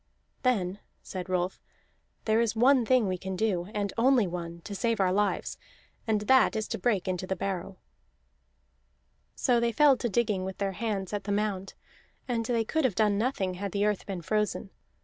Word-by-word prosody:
"Then," 200 Hz, -7 st, 0 dB, 0.2 s
said 185 Hz, -1 st, -6 dB
Rolf, 180 Hz, 0 st, -1 dB, 0.6 s
"there 220 Hz, +1 st, +3 dB
is 230 Hz, -1 st, 0 dB
one 250 Hz, +1 st, +4 dB
thing 255 Hz, -5 st, +4 dB
we 185 Hz, -1 st, -2 dB
can 190 Hz, 0 st, -4 dB
do, 185 Hz, -4 st, 0 dB
and 205 Hz, -2 st, -2 dB
only 250 Hz, -2 st, +4 dB
one, 170 Hz, -1 st, -6 dB
to 205 Hz, -, -7 dB
save 230 Hz, +2 st, 0 dB
our 185 Hz, -1 st, +3 dB
lives; 205 Hz, +1 st, 0 dB, 0.5 s
and 215 Hz, -2 st, +1 dB
that 260 Hz, +3 st, +4 dB
is 215 Hz, -1 st, -2 dB
to -, -, -3 dB
break 195 Hz, -2 st, 0 dB
into 185 Hz, 0 st, -2 dB
the 190 Hz, -, -1 dB
barrow." 190 Hz, 0 st, -4 dB, 1.6 s
So 245 Hz, -3 st, +2 dB
they 235 Hz, 0 st, +1 dB
fell 285 Hz, +3 st, +5 dB
to 240 Hz, -, -2 dB
digging 210 Hz, -3 st, 0 dB
with 190 Hz, 0 st, -5 dB
their 200 Hz, -1 st, -1 dB
hands 200 Hz, -2 st, -3 dB
at 205 Hz, -1 st, -3 dB
the 205 Hz, -, -2 dB
mound, 200 Hz, -2 st, -2 dB, 0.5 s
and 235 Hz, -3 st, 0 dB
they 230 Hz, -1 st, 0 dB
could 315 Hz, +8 st, -1 dB
have 245 Hz, -8 st, +1 dB
done 205 Hz, -1 st, +2 dB
nothing 210 Hz, -6 st, 0 dB
had 195 Hz, +1 st, -5 dB
the 205 Hz, 0 st, +1 dB
earth 210 Hz, -2 st, -1 dB
been 185 Hz, -4 st, -5 dB
frozen. 210 Hz, 0 st, -1 dB
205 Hz, 190 wpm, -28 LUFS, 190-230 Hz, 1.6 s, fell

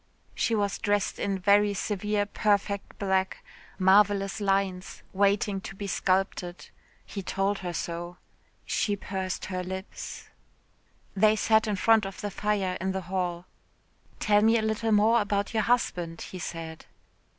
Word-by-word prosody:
She 230 Hz, -, +1 dB
was 205 Hz, -2 st, 0 dB
dressed 205 Hz, -1 st, 0 dB
in 200 Hz, -1 st, -1 dB
very 205 Hz, +2 st, +4 dB
severe 210 Hz, +1 st, -1 dB
perfect 205 Hz, -1 st, 0 dB
black, 190 Hz, -1 st, -1 dB, 0.3 s
marvellous 195 Hz, +1 st, +3 dB
lines, 195 Hz, -2 st, -1 dB
waiting 200 Hz, 0 st, +2 dB
to 195 Hz, -, -8 dB
be 200 Hz, -, -6 dB
sculpted. 185 Hz, -2 st, -1 dB, 0.4 s
He 200 Hz, -, -6 dB
told 195 Hz, +2 st, -1 dB
her 180 Hz, -2 st, -4 dB
so. 175 Hz, +1 st, -5 dB, 0.5 s
She 205 Hz, -, 0 dB
pursed 190 Hz, -2 st, -4 dB
her 185 Hz, -1 st, -3 dB
lips. 190 Hz, +2 st, -7 dB, 0.9 s
They 215 Hz, +2 st, +5 dB
sat 220 Hz, 0 st, +3 dB
in 210 Hz, -, 0 dB
front 220 Hz, +1 st, +4 dB
of 195 Hz, -, -9 dB
the 205 Hz, -, -4 dB
fire 195 Hz, -2 st, -1 dB
in 190 Hz, 0 st, -1 dB
the 190 Hz, -, -2 dB
hall. 180 Hz, -1 st, -3 dB, 0.7 s
"Tell 210 Hz, -1 st, +4 dB
me 225 Hz, +2 st, +5 dB
a 220 Hz, -, 0 dB
little 220 Hz, +1 st, 0 dB
more 220 Hz, +3 st, +5 dB
about 205 Hz, +1 st, -1 dB
your 220 Hz, -, +2 dB
husband?" 180 Hz, -8 st, 0 dB
he 185 Hz, -, -7 dB
said. 165 Hz, -2 st, -7 dB
200 Hz, 145 wpm, -28 LUFS, 185-210 Hz, 0.9 s, They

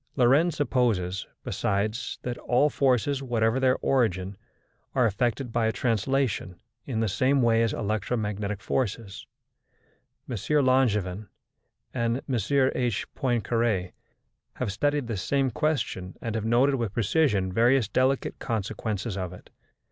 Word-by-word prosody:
Lorentz 145 Hz, +6 st, +3 dB
supposes, 110 Hz, -10 st, 0 dB, 0.2 s
besides, 105 Hz, +4 st, -2 dB
that 125 Hz, -1 st, -3 dB
all 140 Hz, +5 st, +2 dB
forces, 135 Hz, +1 st, +1 dB
whatever 120 Hz, -1 st, +1 dB
their 130 Hz, -1 st, +3 dB
origin, 100 Hz, -7 st, +1 dB, 0.6 s
are 125 Hz, -, +4 dB
affected 120 Hz, +3 st, 0 dB
by 115 Hz, -1 st, +2 dB
a -, -, +2 dB
translation 115 Hz, -5 st, -1 dB, 0.3 s
in 115 Hz, -5 st, -1 dB
the 110 Hz, -, +1 dB
same 130 Hz, +7 st, +2 dB
way 115 Hz, -1 st, +4 dB
as 115 Hz, -1 st, +2 dB
electromagnetic 105 Hz, -1 st, -2 dB
forces. 105 Hz, -5 st, -3 dB, 1.0 s
M. 125 Hz, -, -3 dB, 0.3 s
Langevin 105 Hz, -7 st, +1 dB, 0.7 s
and 115 Hz, -1 st, 0 dB
M. 135 Hz, -, -2 dB, 0.4 s
H. 120 Hz, -5 st, 0 dB
Poincaré 115 Hz, -7 st, 0 dB, 0.6 s
have 100 Hz, -, -2 dB
studied 145 Hz, +5 st, 0 dB
this 110 Hz, -5 st, -3 dB
same 135 Hz, +3 st, +1 dB
question 115 Hz, -, -2 dB
and 115 Hz, -, -4 dB
have 110 Hz, -1 st, -2 dB
noted 125 Hz, +5 st, +3 dB
with 115 Hz, -5 st, -2 dB
precision 105 Hz, -, +1 dB
various 120 Hz, +2 st, +3 dB
delicate 130 Hz, +4 st, 0 dB
consequences 110 Hz, -1 st, -3 dB
of 90 Hz, -3 st, -4 dB
it. 90 Hz, -, -14 dB
115 Hz, 125 wpm, -26 LUFS, 105-130 Hz, 1.0 s, are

